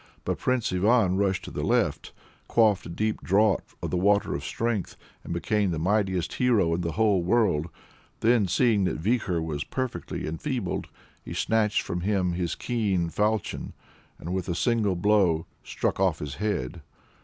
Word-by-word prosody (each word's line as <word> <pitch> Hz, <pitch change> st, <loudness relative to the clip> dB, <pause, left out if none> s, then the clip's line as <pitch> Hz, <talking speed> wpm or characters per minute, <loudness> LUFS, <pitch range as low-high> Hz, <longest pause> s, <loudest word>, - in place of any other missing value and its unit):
But -, -, -2 dB
Prince 125 Hz, -6 st, 0 dB
Ivan 100 Hz, 0 st, +3 dB
rushed 95 Hz, -1 st, 0 dB
to -, -, -8 dB
the -, -, -4 dB
left, -, -, 0 dB, 0.4 s
quaffed 110 Hz, -4 st, +3 dB
a -, -, -8 dB
deep 110 Hz, +6 st, -2 dB
draught 100 Hz, +2 st, +1 dB
of -, -, -2 dB
the 90 Hz, -, 0 dB
Water 100 Hz, +3 st, +2 dB
of -, -, -4 dB
Strength, 115 Hz, -5 st, -2 dB, 0.3 s
and -, -, -8 dB
became 100 Hz, +4 st, 0 dB
the 85 Hz, -, -2 dB
mightiest 95 Hz, 0 st, 0 dB
hero 110 Hz, -10 st, +2 dB
in 85 Hz, -, -1 dB
the 85 Hz, -2 st, -2 dB
whole 105 Hz, -1 st, +3 dB
world. 90 Hz, -5 st, +2 dB, 0.5 s
Then 115 Hz, -3 st, +3 dB
seeing 105 Hz, +1 st, +3 dB
that -, -, -1 dB
Vikhor 90 Hz, -2 st, 0 dB
was 75 Hz, -2 st, -3 dB
perfectly 130 Hz, -9 st, -4 dB
enfeebled, 100 Hz, -, -3 dB, 0.4 s
he -, -, -7 dB
snatched 110 Hz, -2 st, +1 dB
from 90 Hz, -, -3 dB
him 95 Hz, -2 st, +1 dB
his 85 Hz, -1 st, -2 dB
keen 100 Hz, -8 st, -1 dB
faulchion, 105 Hz, +1 st, -1 dB, 0.4 s
and 85 Hz, +3 st, -5 dB
with 95 Hz, -2 st, -2 dB
a 85 Hz, -, -1 dB
single 110 Hz, -2 st, +1 dB
blow 90 Hz, -4 st, +2 dB, 0.2 s
struck -, -, -2 dB
off 95 Hz, -5 st, +2 dB
his 75 Hz, -3 st, -5 dB
head. 85 Hz, -7 st, -2 dB
95 Hz, 165 wpm, -26 LUFS, 85-110 Hz, 0.5 s, Ivan